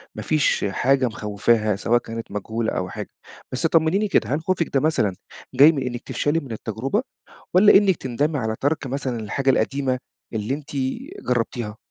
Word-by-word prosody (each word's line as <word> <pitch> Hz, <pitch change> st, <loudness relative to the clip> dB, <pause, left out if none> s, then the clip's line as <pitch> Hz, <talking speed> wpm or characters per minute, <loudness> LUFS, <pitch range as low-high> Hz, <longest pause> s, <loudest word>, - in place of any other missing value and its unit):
ما -, -, -5 dB
فيش 155 Hz, -8 st, +1 dB
حاجة 130 Hz, +6 st, +2 dB
مخوّفاها 105 Hz, 0 st, +1 dB
سواء 115 Hz, +4 st, +2 dB
كانت 115 Hz, -2 st, -7 dB
مجهولة 110 Hz, +2 st, -2 dB
أو 90 Hz, 0 st, -2 dB
حاجة. -, -, -6 dB, 0.4 s
بس 130 Hz, +6 st, -2 dB
طمنيني 165 Hz, +6 st, +2 dB
كده، -, -, +1 dB
هل 155 Hz, -, -3 dB
خوفِك 175 Hz, -1 st, 0 dB
ده 135 Hz, -, +4 dB
مثلًا 130 Hz, -11 st, +1 dB, 0.4 s
جاي 145 Hz, +5 st, +8 dB
من 140 Hz, -4 st, -3 dB
إنّك 120 Hz, -1 st, -4 dB
تفشلي 150 Hz, +3 st, 0 dB
من 135 Hz, -6 st, -10 dB
التجربة 115 Hz, -, -2 dB, 0.5 s
والّا 200 Hz, +3 st, +7 dB
إنِّك 195 Hz, -2 st, +3 dB
تندمي 145 Hz, +4 st, -1 dB
على 110 Hz, -2 st, -2 dB
تَرْك 145 Hz, 0 st, 0 dB
مثلًا 130 Hz, -2 st, -3 dB
الحاجة 130 Hz, +6 st, -1 dB
القديمة 130 Hz, +1 st, +1 dB, 0.3 s
اللي 110 Hz, +4 st, -2 dB
أنتِ 145 Hz, 0 st, -6 dB, 0.6 s
جرّبتيها؟ 115 Hz, -3 st, -1 dB
130 Hz, 165 wpm, -23 LUFS, 110-150 Hz, 0.6 s, جاي